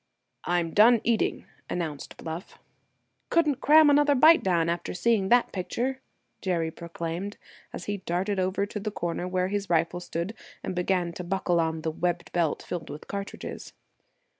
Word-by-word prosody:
"I'm 175 Hz, -2 st, 0 dB
done 230 Hz, +3 st, +7 dB
eating," 230 Hz, -2 st, 0 dB, 0.2 s
announced 155 Hz, -5 st, -4 dB
Bluff. 165 Hz, +2 st, -7 dB, 0.7 s
"Couldn't 300 Hz, -5 st, +2 dB
cram 310 Hz, +1 st, +7 dB
another 290 Hz, 0 st, +5 dB
bite 315 Hz, +5 st, +7 dB
down, 170 Hz, -3 st, +2 dB
after 170 Hz, +1 st, -2 dB
seeing 200 Hz, 0 st, +2 dB
that 245 Hz, 0 st, +4 dB
picture!" 250 Hz, +8 st, -2 dB, 0.4 s
Jerry 170 Hz, -4 st, 0 dB
proclaimed, 170 Hz, +4 st, -5 dB, 0.3 s
as -, -, -7 dB
he 205 Hz, 0 st, -2 dB
darted 190 Hz, +2 st, -1 dB
over 190 Hz, +2 st, 0 dB
to 210 Hz, +1 st, -6 dB
the 215 Hz, +1 st, -3 dB
corner 175 Hz, -3 st, -3 dB
where 185 Hz, 0 st, 0 dB
his 200 Hz, 0 st, -2 dB
rifle 170 Hz, +1 st, +1 dB
stood, 175 Hz, +3 st, -4 dB, 0.3 s
and -, -, -3 dB
began 180 Hz, -1 st, 0 dB
to 180 Hz, -, -6 dB
buckle 175 Hz, -1 st, 0 dB
on 160 Hz, -1 st, -1 dB
the 160 Hz, -, -1 dB
webbed 175 Hz, +2 st, -2 dB
belt 170 Hz, -3 st, 0 dB
filled 175 Hz, -2 st, -5 dB
with 150 Hz, -, -8 dB
cartridges. 200 Hz, 0 st, -6 dB
180 Hz, 160 wpm, -27 LUFS, 170-210 Hz, 0.7 s, done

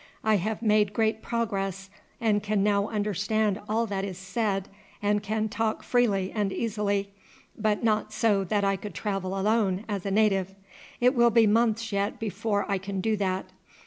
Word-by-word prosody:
I 215 Hz, -1 st, +3 dB
have 215 Hz, +4 st, -3 dB
made 210 Hz, -2 st, +3 dB
great 220 Hz, 0 st, +1 dB
progress, 195 Hz, -5 st, -2 dB, 0.3 s
and 215 Hz, -2 st, +2 dB
can 205 Hz, -1 st, 0 dB
now 200 Hz, 0 st, +2 dB
understand 210 Hz, 0 st, 0 dB
all 225 Hz, +2 st, +1 dB
that 200 Hz, -3 st, -3 dB
is 190 Hz, -3 st, -5 dB
said 195 Hz, 0 st, -2 dB, 0.3 s
and 205 Hz, 0 st, +1 dB
can 215 Hz, +1 st, -1 dB
talk 220 Hz, +1 st, -2 dB
freely 205 Hz, -6 st, +1 dB
and 205 Hz, -3 st, 0 dB
easily, 200 Hz, -2 st, -1 dB, 0.4 s
but 215 Hz, +1 st, 0 dB
not 215 Hz, -1 st, +1 dB
so 205 Hz, -4 st, +2 dB
that 205 Hz, +2 st, 0 dB
I 195 Hz, 0 st, +2 dB
could 200 Hz, -2 st, -8 dB
travel 195 Hz, -2 st, -2 dB
alone 205 Hz, -1 st, +1 dB
as 200 Hz, -4 st, -3 dB
a 200 Hz, -, -2 dB
native. 195 Hz, -2 st, +2 dB, 0.4 s
It 250 Hz, +1 st, +4 dB
will 240 Hz, -2 st, +5 dB
be 230 Hz, 0 st, +5 dB
months 225 Hz, +1 st, +2 dB
yet 200 Hz, 0 st, -1 dB
before 205 Hz, -1 st, -1 dB
I 200 Hz, -2 st, 0 dB
can 195 Hz, 0 st, -4 dB
do 220 Hz, +3 st, +1 dB
that. 190 Hz, -1 st, -2 dB
205 Hz, 175 wpm, -27 LUFS, 195-220 Hz, 0.4 s, will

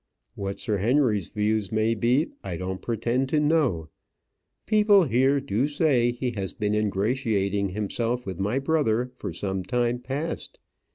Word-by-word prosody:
What 100 Hz, 0 st, -5 dB
Sir 105 Hz, -4 st, -1 dB
Henry's 110 Hz, -, +2 dB
views 105 Hz, -2 st, 0 dB
may 110 Hz, +1 st, +2 dB
be, 120 Hz, +8 st, +1 dB
I 90 Hz, -4 st, -4 dB
don't 95 Hz, +1 st, -4 dB
pretend 120 Hz, +3 st, -1 dB
to 155 Hz, -, +2 dB
know. 145 Hz, -, +1 dB, 0.8 s
People 210 Hz, -2 st, +5 dB
here 135 Hz, 0 st, +3 dB
do 135 Hz, -1 st, 0 dB
say 145 Hz, -5 st, +2 dB
that 120 Hz, -, -4 dB
he 125 Hz, 0 st, -1 dB
has 100 Hz, -5 st, -4 dB
been 105 Hz, -1 st, -1 dB
ingratiating 105 Hz, -1 st, 0 dB
himself 115 Hz, +5 st, -2 dB
with 95 Hz, -2 st, -5 dB
my 105 Hz, +6 st, 0 dB
brother 135 Hz, -5 st, +1 dB
for 100 Hz, -6 st, -5 dB
some 95 Hz, +3 st, -3 dB
time 120 Hz, +5 st, 0 dB
past. 135 Hz, +6 st, -4 dB
115 Hz, 155 wpm, -26 LUFS, 100-135 Hz, 0.8 s, People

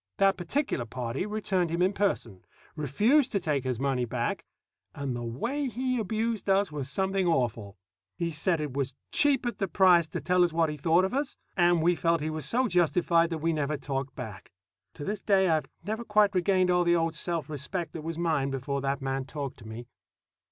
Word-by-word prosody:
That 195 Hz, -1 st, +4 dB
particular 180 Hz, -, -1 dB
party 125 Hz, -, -3 dB
returned 195 Hz, -5 st, 0 dB
him 170 Hz, +2 st, +1 dB
in 190 Hz, +2 st, +2 dB
person, 120 Hz, -, -1 dB, 0.3 s
refused 210 Hz, -, +2 dB
to 200 Hz, -, +2 dB
take 150 Hz, -6 st, -1 dB
his 125 Hz, -3 st, -1 dB
money 135 Hz, -2 st, 0 dB
back, 120 Hz, 0 st, -2 dB, 0.5 s
and 140 Hz, -3 st, -3 dB
the 120 Hz, -, -4 dB
way 235 Hz, -, -2 dB
he 255 Hz, +1 st, -1 dB
abused 220 Hz, 0 st, -2 dB
us 195 Hz, -2 st, +3 dB
was 140 Hz, -3 st, -4 dB
something 190 Hz, +4 st, 0 dB
awful. 115 Hz, -, -1 dB, 0.4 s
He 170 Hz, -1 st, -1 dB
said 165 Hz, +2 st, 0 dB
it 150 Hz, -4 st, -3 dB
was 135 Hz, -1 st, -2 dB, 0.2 s
cheap 280 Hz, -4 st, +3 dB
at 240 Hz, -4 st, -3 dB
the 195 Hz, -, 0 dB
price 180 Hz, -3 st, +5 dB
to -, -, -4 dB
tell 180 Hz, 0 st, +3 dB
us 175 Hz, -, +2 dB
what 160 Hz, -1 st, +1 dB
he 150 Hz, -, -6 dB
thought 165 Hz, +5 st, +3 dB
of 190 Hz, -, -3 dB
us; 280 Hz, +1 st, -2 dB, 0.2 s
and 175 Hz, -2 st, +3 dB
we 175 Hz, +2 st, +4 dB
felt 165 Hz, 0 st, +1 dB
he 155 Hz, +1 st, -2 dB
was 155 Hz, -3 st, -3 dB
so 250 Hz, -, +2 dB
justified 170 Hz, -2 st, +3 dB
that 165 Hz, -, -2 dB
we 165 Hz, -, +2 dB
never 150 Hz, -1 st, -1 dB
talked 135 Hz, -1 st, -4 dB
back. 105 Hz, -3 st, -8 dB, 0.4 s
But -, -, -25 dB
to 145 Hz, -, -6 dB
this 205 Hz, 0 st, -2 dB
day 195 Hz, -2 st, +3 dB
I've 155 Hz, -1 st, +1 dB, 0.2 s
never 220 Hz, +3 st, -3 dB
quite 210 Hz, -2 st, +3 dB
regained 185 Hz, 0 st, +2 dB
all 180 Hz, 0 st, +3 dB
the 170 Hz, 0 st, +3 dB
old 165 Hz, -1 st, +1 dB
self 165 Hz, -1 st, -3 dB
respect 155 Hz, +3 st, -4 dB
that 160 Hz, -, -5 dB
was 165 Hz, +1 st, -5 dB
mine 160 Hz, -5 st, +1 dB
before 135 Hz, +1 st, -3 dB
that 135 Hz, 0 st, -2 dB
man 135 Hz, 0 st, -2 dB
talked 140 Hz, -1 st, -5 dB
to 110 Hz, -, -12 dB
me. 115 Hz, +2 st, -7 dB
165 Hz, 210 wpm, -28 LUFS, 140-195 Hz, 0.5 s, price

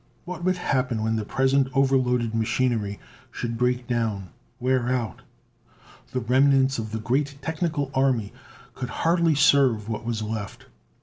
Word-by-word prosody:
What 175 Hz, -1 st, -6 dB
would 185 Hz, 0 st, +1 dB
happen 125 Hz, -9 st, 0 dB
when 110 Hz, 0 st, 0 dB
the 110 Hz, -, -1 dB
present 135 Hz, +3 st, +2 dB
overloaded 125 Hz, -4 st, +2 dB
machinery 110 Hz, -2 st, 0 dB, 0.3 s
should 120 Hz, -1 st, -4 dB
break 125 Hz, +1 st, 0 dB
down; 110 Hz, -6 st, -2 dB, 0.3 s
wear 125 Hz, -1 st, +1 dB
out? 120 Hz, -6 st, -2 dB, 0.9 s
The 130 Hz, -, -1 dB
remnants 135 Hz, +2 st, +3 dB
of 110 Hz, -1 st, -5 dB
the 110 Hz, -, -2 dB
great 135 Hz, +6 st, -1 dB
technical 155 Hz, -3 st, -2 dB
army 130 Hz, -6 st, +1 dB, 0.4 s
could 125 Hz, -, -5 dB
hardly 165 Hz, -1 st, +2 dB
serve 135 Hz, -7 st, +4 dB
what 110 Hz, +1 st, -3 dB
was 115 Hz, -2 st, -2 dB
left. 110 Hz, -2 st, -5 dB
125 Hz, 140 wpm, -25 LUFS, 115-135 Hz, 0.9 s, serve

